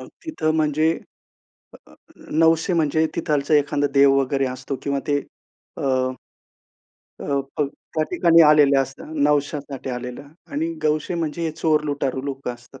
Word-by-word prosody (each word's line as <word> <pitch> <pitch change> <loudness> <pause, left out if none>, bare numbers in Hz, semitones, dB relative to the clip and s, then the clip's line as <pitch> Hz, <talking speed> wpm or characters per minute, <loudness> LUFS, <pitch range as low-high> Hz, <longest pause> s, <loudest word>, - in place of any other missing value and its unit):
मग - - -10 0.2
तिथं 155 - -1
म्हणजे, 155 +1 +2 1.0
अ, - - -18 0.4
नवशे 165 +3 +3
म्हणजे 160 -1 +2
तिथालचा 150 0 0
एखादा 145 0 +1
देव 140 0 +5
वगैरे 135 0 0
असतो 130 +2 -5
किंवा 140 -1 -1
ते 145 -1 +2 0.6
अ - - -5 1.4
अ, - - -6 0.3
पग 145 -2 +1 0.3
त्या 155 - +2
ठिकाणी 170 -2 +5
आलेले 145 -2 +5
असतात. 135 0 -3 0.2
नवश्यासाठी 145 -2 -1
आलेला 125 +3 -6 0.3
आणि 320 +3 -1
गवशे 155 +3 0
म्हणजे 170 0 -3
हे 165 - 0
चोर 155 -1 +1
लुटारू 140 -3 -2
लोकं 135 -3 -4
असतात. 120 +2 -17
145 Hz, 140 wpm, -22 LUFS, 140-155 Hz, 1.4 s, देव